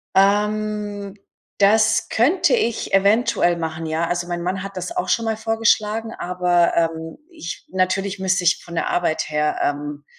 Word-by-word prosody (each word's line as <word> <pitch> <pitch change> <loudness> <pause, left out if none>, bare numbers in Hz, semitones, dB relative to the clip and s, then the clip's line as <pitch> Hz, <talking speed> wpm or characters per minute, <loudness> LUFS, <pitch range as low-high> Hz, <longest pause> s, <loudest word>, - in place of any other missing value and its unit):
Ähm. 205 0 +1 0.4
Das 215 +2 +3
könnte 305 - +2
ich 235 - -1
eventuell 200 -3 +3
machen, 160 -1 -4
ja. 160 +2 -1
Also, 175 0 -2
mein 175 0 -4
Mann 185 +2 -3
hat 195 -1 -8
das 185 - -4
auch 360 - -1
schon 230 - +1
mal 220 -1 0
vorgeschlagen, 225 0 0
aber, 175 -1 +1
ähm, 165 -1 -1
ich 240 - -8
natürlich 190 +2 -1
müsste 190 0 +1
ich 175 0 +2
von 170 - -10
der - - -1
Arbeit 160 -3 -1
her, 150 0 0
ähm, 145 0 -3
190 Hz, 160 wpm, -21 LUFS, 170-215 Hz, 0.4 s, Das